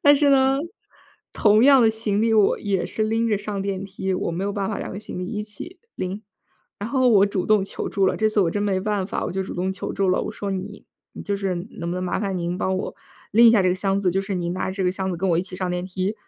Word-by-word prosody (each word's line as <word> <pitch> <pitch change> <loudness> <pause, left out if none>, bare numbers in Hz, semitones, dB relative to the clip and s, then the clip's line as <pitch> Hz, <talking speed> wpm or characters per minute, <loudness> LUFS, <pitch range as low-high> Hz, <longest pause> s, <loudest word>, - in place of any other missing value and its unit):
但 290 0 +7
是 285 0 +3
呢， 270 0 +4 0.7
同 215 +2 +4
样 275 -2 +7
的 225 - +5
行 220 -2 -1
李， 225 0 +2
我 210 -3 +4
也 195 -3 -1
是 220 - -3
拎 225 +1 +1
着 210 - +2
上 205 -1 -4
电 195 -1 -3
梯， 190 -1 -3
我 185 - -2
没 175 +3 -3
有 200 - -1
办 195 -1 -2
法 210 - -3
两 - - -5
个 195 - -5
行 215 - -7
李 180 - -3
一 210 +2 -3
起 215 - -8 0.2
拎。 190 +3 -4 0.6
然 205 - -4
后 260 -1 +3
我 205 -4 +6
主 200 -2 -2
动 210 -2 +3
求 - - -5
助 195 -1 +1
了， - - +1
这 220 0 +2
次 215 -1 +1
我 175 -4 +2
真 205 +4 -1
没 195 -2 +1
办 205 -1 -1
法， - - -3
我 - - -4
就 190 +1 -1
主 190 - -6
动 185 +2 -1
求 190 - -5
助 195 -1 0
了。 185 - +2
我 - - -4
说： 205 - -5
“你 195 +2 -6 0.3
你， - - -7
就 200 -1 -2
是 195 -2 -1 0.2
能 170 0 -5
不 - - -2
能 185 - -3
麻 180 - -1
烦 195 -3 -2
您 175 +1 -2
帮 190 0 0
我 190 - -4 0.4
拎 230 +3 +7
一 - - +8
下 225 -3 +4
这 185 - +3
个 180 - +2
箱 195 +1 0
子， 185 -2 +2
就 190 - +1
是 195 0 -4
您 175 -1 -2
拿 185 - -2
着 - - -6
这 195 -1 -2
个 180 - +2
箱 190 0 -3
子 180 - -3
跟 190 +3 -1
我 165 - +3
一 - - +1
起 185 0 -8
上 185 0 -2
电 180 0 -2
梯， 190 +2 -2
195 Hz, 320 characters per minute, -23 LUFS, 185-215 Hz, 0.7 s, 一